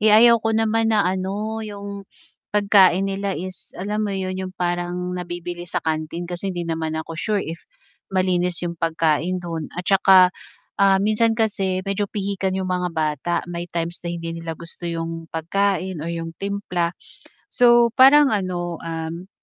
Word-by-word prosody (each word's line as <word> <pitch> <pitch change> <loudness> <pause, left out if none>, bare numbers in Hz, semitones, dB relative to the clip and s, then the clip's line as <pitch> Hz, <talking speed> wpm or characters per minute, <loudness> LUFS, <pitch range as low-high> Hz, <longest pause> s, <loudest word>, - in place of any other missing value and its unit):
Eh, 215 - +4
ayaw 230 +2 +7
ko 225 0 0
naman 225 0 +2
na 215 -3 +3
ano 195 +4 -2
yung 200 -2 -7 0.4
pagkain 195 -2 +4
nila 195 -1 -2
is 185 +2 -7
alam 210 +3 -2
mo 195 - -2
yun 185 0 -2 0.2
yung 185 - -14
parang 175 0 -1 0.2
nabibili 175 -1 -5
sa - - -2
kantin 160 +2 -2
kasi 175 +2 -4
hindi 175 -2 -3
naman 160 -1 -2
ako 160 +1 -5
sure 210 0 0
if 165 - -8 0.4
malinis 180 -2 +1
yung 170 - -2
pagkain 165 +2 +1
dun 165 -3 -4
at 180 - -4
tsaka, 190 -2 +6 0.5
ah, 195 -1 +6
minsan 220 +1 +2
kasi 195 -4 0
medyo 200 +1 -1
pihikan 195 -2 -2
yung 190 -1 -2
mga 180 0 0
bata 155 +2 -1
may 175 0 -6
times 170 0 -3
na 175 - -5
hindi 165 -1 -4
nila 165 -1 -5
gusto 170 +1 -6
yung 165 0 -4
pagkain 185 +2 -1
or 160 - -4
yung 165 -1 -4
timpla. 180 -4 -2 0.6
So 240 -1 +5
parang 270 +2 +7
ano, 175 -4 -2
um 165 +2 -5
185 Hz, 165 wpm, -22 LUFS, 170-200 Hz, 0.6 s, ayaw